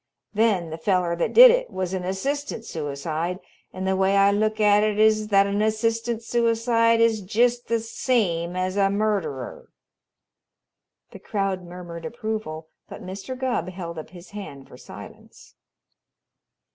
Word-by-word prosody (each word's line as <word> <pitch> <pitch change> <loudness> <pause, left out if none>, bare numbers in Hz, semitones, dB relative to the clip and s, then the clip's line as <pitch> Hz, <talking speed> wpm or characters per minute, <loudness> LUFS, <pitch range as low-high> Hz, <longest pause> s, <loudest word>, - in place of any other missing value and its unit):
Then 205 -7 +1
the 160 - -6
feller 180 -1 +1
that 170 - 0
did - - +10
it - - 0
was 185 -1 -4
an 185 -1 -3
assistant 250 +6 -3
suicide, 160 +3 -4 0.3
and 185 0 -5
the 190 0 +1
way 190 +1 +2
I 200 0 +5
look 215 +1 0
at 210 -1 +5
it 210 -1 0
is 215 0 +3
that 200 -1 +4
an 200 +1 -1
assistant 230 +1 -1
suicide 230 0 +2
is 225 -2 +3
jest 240 +5 +1
the 230 0 +1
same 200 -7 -1
as 185 +1 -2
a 195 -1 +3
murderer." 195 - -2 1.4
The - - -11
crowd 195 -3 -2
murmured 175 -1 -9
approval, 215 -9 -5 0.2
but - - -9
Mr. 195 +7 -7
Gubb 255 -8 -2
held 170 -3 -7
up 155 - -9
his 180 0 -14
hand 145 -10 -9
for - - -14
silence. - - -13
200 Hz, 150 wpm, -24 LUFS, 180-225 Hz, 1.4 s, did